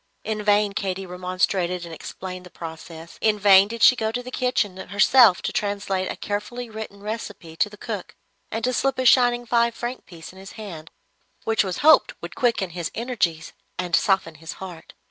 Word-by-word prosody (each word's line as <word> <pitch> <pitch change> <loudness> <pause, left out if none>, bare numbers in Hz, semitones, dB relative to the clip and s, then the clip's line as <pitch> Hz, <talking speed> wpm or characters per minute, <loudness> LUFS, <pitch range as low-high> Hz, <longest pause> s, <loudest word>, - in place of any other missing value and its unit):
In 215 0 -3
vain 205 -1 +2
Katy 195 -1 -3
remonstrated 180 0 -1
and 165 - -9
explained 185 +2 -8
the 180 - -13
process. 165 0 -10
In 215 -1 +3
vain 200 -1 +7
did 230 +1 -4
she 255 - +8
go 220 -2 -1
to 245 +2 -3
the 255 - -8
kitchen 250 -7 0
herself 205 +1 +5
to - - -2
translate 200 -2 -1
a - - -5
carefully 225 +4 -5
written 215 -2 -8
recipe 205 -6 -6
to 210 - +2
the 210 - -13
cook, 210 -3 -6 0.3
and 225 +1 -4
to 255 - +1
slip 270 +1 0
a 260 - -1
shining 245 -1 +5
five 235 0 +2
franc 245 +2 -5
piece 170 -1 -11
in 190 - -14
his 195 +1 -11
hand, 175 -8 -9 0.5
which 225 -1 +2
it - - -4
was 185 - -3
hoped 315 - +6
would - - -8
quicken 230 -8 0
his 170 -1 -4
energies 210 -9 -2 0.2
and 180 -2 0
soften 190 -5 +1
his 160 +1 -8
heart. 180 -4 -10
200 Hz, 195 wpm, -23 LUFS, 180-230 Hz, 0.5 s, she